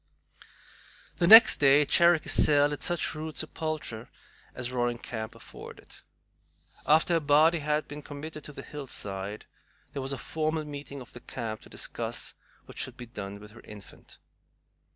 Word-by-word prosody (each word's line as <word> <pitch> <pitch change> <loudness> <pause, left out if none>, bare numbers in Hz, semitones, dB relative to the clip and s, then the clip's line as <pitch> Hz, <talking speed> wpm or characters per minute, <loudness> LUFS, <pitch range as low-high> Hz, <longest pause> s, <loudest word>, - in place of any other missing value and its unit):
The 170 - +2
next 225 +3 +10
day 145 +1 +5
Cherokee 170 +2 +4
Sal 145 -1 +4
had 145 - -5
such 175 -2 -1
rude 155 0 -6
sepulture 155 -8 -4 0.5
as 125 -1 -4
Roaring 120 -1 -1
Camp 110 -2 -7
afforded. - - -13 0.9
After 160 +4 +4
her 165 - +3
body 155 +3 +4
had 150 +1 -1
been 150 0 -8
committed 150 +1 -8
to - - -7
the - - -9
hillside, 105 -8 -5 0.5
there 140 - -4
was 135 +1 -5
a 135 - -3
formal 155 +1 -2
meeting 140 -1 -8
of 125 - -13
the 125 - -9
camp 110 -2 -6
to - - -15
discuss - - -4 0.3
what - - -11
should 130 -1 -1
be 125 - -8
done 100 -3 -8
with 105 0 -13
her 115 - -14
infant. 105 -2 -14
145 Hz, 155 wpm, -28 LUFS, 120-155 Hz, 0.9 s, next